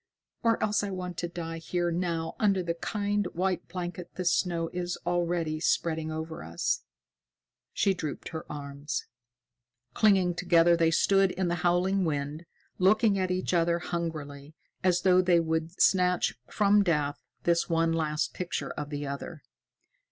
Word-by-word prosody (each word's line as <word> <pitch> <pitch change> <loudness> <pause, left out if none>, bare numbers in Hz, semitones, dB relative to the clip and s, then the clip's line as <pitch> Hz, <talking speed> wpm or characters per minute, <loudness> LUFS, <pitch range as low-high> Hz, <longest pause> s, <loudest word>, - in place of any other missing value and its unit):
Or 230 -1 +2
else 210 -1 +1
I 205 - -2
want 180 -2 -5
to 175 - -2
die 165 -1 -5
here 175 +1 -1
now 165 -2 -2
under 195 -4 +2
the 170 -1 -1
kind, 205 +3 -1
white 185 0 -1
blanket 180 -1 -6
the 185 - -4
snow 170 -1 +1
is 180 0 -3
already 170 -3 0
spreading 160 -1 0
over 160 +1 -5
us." 85 +1 -1 0.9
She 195 - +2
drooped 155 -5 -5
in - - -16
his 160 - -4
arms. 145 0 -5 0.9
Clinging 190 -4 +4
together, 170 -1 +4
they 165 -1 +3
stood 195 +3 +3
in 180 -1 -1
the - - 0
howling 180 +2 +2
wind, 150 +1 -3 0.3
looking 205 +2 +4
at 185 -1 0
each 185 0 -1
other 170 0 +3
hungrily, 155 -4 -5 0.3
as 180 -1 +3
though 185 -1 +5
they 180 -2 +4
would 160 +1 -2
snatch 180 -1 +3 0.2
from 205 0 +4
death 150 -5 0 0.2
this 170 0 +2
one 165 0 +2
last 155 -2 -1
picture 180 -1 -3
of 150 -1 -5
the 145 -1 -4
other. 140 +2 -6
175 Hz, 155 wpm, -28 LUFS, 160-185 Hz, 0.9 s, though